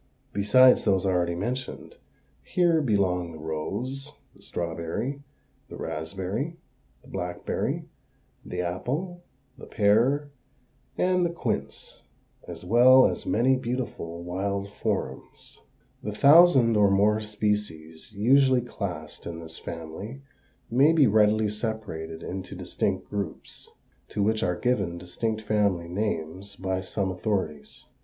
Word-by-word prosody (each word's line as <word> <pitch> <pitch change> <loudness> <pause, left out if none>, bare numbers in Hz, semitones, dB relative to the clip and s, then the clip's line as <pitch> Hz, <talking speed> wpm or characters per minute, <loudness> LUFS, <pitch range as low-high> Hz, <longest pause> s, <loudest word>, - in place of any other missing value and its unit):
Besides 115 +6 +5
those 95 -1 +2
already 90 -2 +1
mentioned, 125 +8 -4 0.4
here 170 - +2
belong 95 - 0
the - - -9
rose, 125 - -4 0.2
the - - -20
strawberry, 85 - -4 0.5
the - - -8
raspberry, 95 - -4 0.5
the - - -18
blackberry, 90 0 -3 0.6
the 90 - -4
apple, 135 - -3 0.4
the - - -10
pear, 125 +8 +2 0.7
and 180 0 +2
the 175 - +2
quince, 170 - -4 0.5
as - - -8
well 125 +6 +7
as - - -2
many 130 +4 +3
beautiful 120 -9 -4
wild 100 +3 -3
forms. - - -4 0.4
The 105 - -4
thousand 140 -2 +6
or 105 -1 +5
more 105 +2 +3
species 105 -7 -3
usually 130 +5 +4
classed 90 -10 -6
in 85 -1 -6
this 80 0 -9
family 90 +11 -7 0.5
may 140 +7 +5
be 155 -4 +5
readily 110 -1 +4
separated 100 -7 -5
into 95 0 -6
distinct - - -2
groups, 100 -1 -6 0.4
to 105 - -1
which 110 +1 +1
are 90 -1 +1
given 100 -7 0
distinct 110 +5 -3
family 100 -5 +1
names 95 0 -3
by 95 -1 -2
some 95 +1 -2
authorities. 90 -5 -3
105 Hz, 120 wpm, -26 LUFS, 90-125 Hz, 0.7 s, well